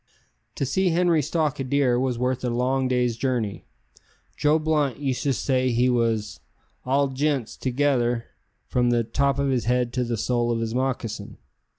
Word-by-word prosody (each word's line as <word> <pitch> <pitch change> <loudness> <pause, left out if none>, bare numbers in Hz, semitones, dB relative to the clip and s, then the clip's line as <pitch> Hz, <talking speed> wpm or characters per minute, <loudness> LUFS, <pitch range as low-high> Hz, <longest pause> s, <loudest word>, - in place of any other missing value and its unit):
To 140 - -1
see 185 +7 +1
Henri 170 -2 +3
stalk 150 -1 -1
a - - -1
deer 130 -2 +2
was 130 -2 -1
worth 125 +1 -1
a 125 - 0
long 130 +2 0
day's 125 -2 +1
journey. 115 -5 -2 0.7
Joe 150 +1 +3
Blunt 150 -5 0
used 135 -3 -2
to 140 - +1
say 130 0 +1
he 125 +1 +2
was 115 -3 0 0.5
"all 140 +2 +2
jints 135 -3 -1
together, 125 -3 0 0.4
from 125 -1 +1
the 120 -1 +2
top 140 +5 0
of 140 0 0
his 125 -5 0
head 125 0 +1
to 125 0 0
the 120 -1 -2
sole 120 +2 0
of 115 - 0
his 115 0 -2
moccasin." 120 -5 -3
130 Hz, 175 wpm, -24 LUFS, 120-140 Hz, 0.7 s, Henri